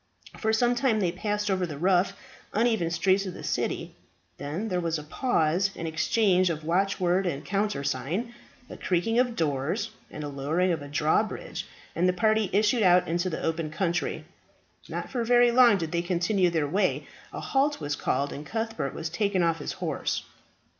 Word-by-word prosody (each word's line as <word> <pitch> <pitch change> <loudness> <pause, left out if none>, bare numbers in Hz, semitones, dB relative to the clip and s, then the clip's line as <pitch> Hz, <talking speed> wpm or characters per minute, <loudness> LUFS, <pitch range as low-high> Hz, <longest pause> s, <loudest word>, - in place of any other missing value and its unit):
For 220 - +1
some 240 +2 +3
time 245 -3 +1
they 180 -4 +1
passed 210 +2 -2
over 185 -2 0
the 150 -3 -6
rough, 180 +3 +2 0.4
uneven 220 -6 +2
streets 190 +3 +2
of 180 - -6
the - - -9
city; - - -2 0.4
then 155 +10 -3
there 180 -2 0
was 165 -2 -1
a 150 - -7
pause 175 - +1
and 165 - -4
exchange 185 +3 +2
of 155 -2 -3
watchword 185 +2 +1
and 145 -4 -3
countersign, 185 - -1 0.3
a - - -9
creaking 190 +6 +1
of 245 -2 +1
doors, 160 - -1 0.2
and 150 - -7
a - - -3
lowering 150 +6 0
of 165 -3 -1
a 145 - -7
drawbridge, 150 +2 -1 0.3
and 180 +2 +3
the - - +2
party 215 +1 +2
issued 215 +4 +3
out 180 -2 +5
into 175 +2 0
the 155 - -4
open 165 -1 -1
country. 170 +2 -2 0.6
Not - - -5
for 245 -3 -1
very 240 +1 +5
long 240 -3 +6
did 165 -3 -4
they 170 - 0
continue 180 +2 +1
their 160 -3 0
way; 185 +5 0 0.3
a - - -6
halt 280 +2 +1
was 145 -1 -2
called, 140 -1 -1
and 145 - -7
Cuthbert 225 - -3
was 165 - -3
taken 190 +1 0
off 165 -1 +1
his 145 - -4
horse. - - -2
180 Hz, 180 wpm, -27 LUFS, 160-215 Hz, 0.6 s, long